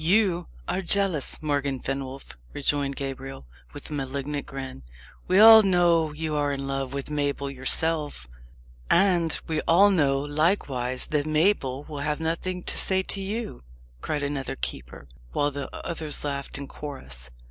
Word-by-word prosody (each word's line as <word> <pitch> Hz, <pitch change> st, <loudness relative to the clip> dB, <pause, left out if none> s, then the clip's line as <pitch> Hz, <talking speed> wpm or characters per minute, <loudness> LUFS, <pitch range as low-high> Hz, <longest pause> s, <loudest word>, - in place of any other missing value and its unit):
"You 180 Hz, -1 st, +2 dB, 0.2 s
are 180 Hz, +2 st, -1 dB
jealous, 190 Hz, -5 st, +2 dB
Morgan 140 Hz, -3 st, -1 dB
Fenwolf," 135 Hz, -, -5 dB, 0.2 s
rejoined 140 Hz, -1 st, -1 dB
Gabriel, 135 Hz, -, -6 dB, 0.3 s
with -, -, -8 dB
a -, -, -3 dB
malignant 140 Hz, +1 st, -3 dB
grin. 135 Hz, -, -7 dB, 0.5 s
"We 185 Hz, -, +3 dB
all 220 Hz, 0 st, +11 dB
know 175 Hz, -5 st, +3 dB
you 155 Hz, +1 st, -4 dB
are 145 Hz, -1 st, +1 dB
in 140 Hz, 0 st, -4 dB
love 135 Hz, -1 st, -2 dB
with 140 Hz, +1 st, -5 dB
Mabel 140 Hz, -1 st, -1 dB
yourself." 145 Hz, -, 0 dB, 0.6 s
"And 175 Hz, -4 st, +3 dB
we 155 Hz, -1 st, -1 dB
all 195 Hz, +5 st, +6 dB
know, 140 Hz, -7 st, +2 dB
likewise, 145 Hz, -5 st, +1 dB
that 150 Hz, 0 st, +1 dB
Mabel 155 Hz, -4 st, +1 dB
will 150 Hz, -2 st, -7 dB
have 150 Hz, +1 st, -1 dB
nothing 170 Hz, +3 st, -2 dB
to -, -, -1 dB
say 190 Hz, 0 st, +1 dB
to 195 Hz, -, -4 dB
you!" 210 Hz, -, -4 dB, 0.4 s
cried 150 Hz, -2 st, -2 dB
another 140 Hz, -2 st, -3 dB
keeper, -, -, -6 dB, 0.3 s
while 145 Hz, 0 st, +1 dB
the 140 Hz, -1 st, -5 dB, 0.2 s
others 155 Hz, -3 st, -2 dB
laughed 140 Hz, -1 st, -4 dB
in 140 Hz, -, -6 dB
chorus. 65 Hz, -, -8 dB
145 Hz, 150 wpm, -26 LUFS, 135-170 Hz, 0.6 s, all